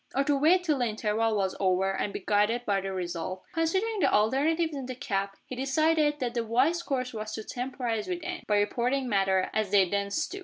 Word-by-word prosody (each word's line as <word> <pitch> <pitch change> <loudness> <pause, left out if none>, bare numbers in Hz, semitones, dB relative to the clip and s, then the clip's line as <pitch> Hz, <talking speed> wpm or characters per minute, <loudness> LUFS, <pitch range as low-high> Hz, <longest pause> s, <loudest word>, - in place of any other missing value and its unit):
Or 275 - +3
to 285 +1 +2
wait 330 +6 +4
till 305 -5 +1
the 245 - +2
interval 220 0 0
was 190 -2 0
over, 190 0 +1
and 200 - -2
be 200 - -6
guided 215 +4 +2
by 200 -1 +1
the 195 0 -4
result? 185 0 -4
Considering 380 +7 0
the - - +3
alternatives 300 +10 +2
in 270 -3 -5
the 255 - -5
cab, 200 -6 -2 0.2
he 255 - -7
decided 295 +3 +2
that 245 -2 -2
the 235 -1 -1
wise 260 +10 +2
course 255 -6 -2
was 215 -1 -5
to 220 - -5
temporize 245 -3 -3
with 355 -2 -3
Anne, 365 -1 -4
by 210 - +3
reporting 250 +6 0
matters 195 -3 +2
as 215 -2 0
they 195 -2 +4
then 200 +2 -1
stood. 315 - -2
240 Hz, 220 wpm, -28 LUFS, 205-290 Hz, 0.2 s, wait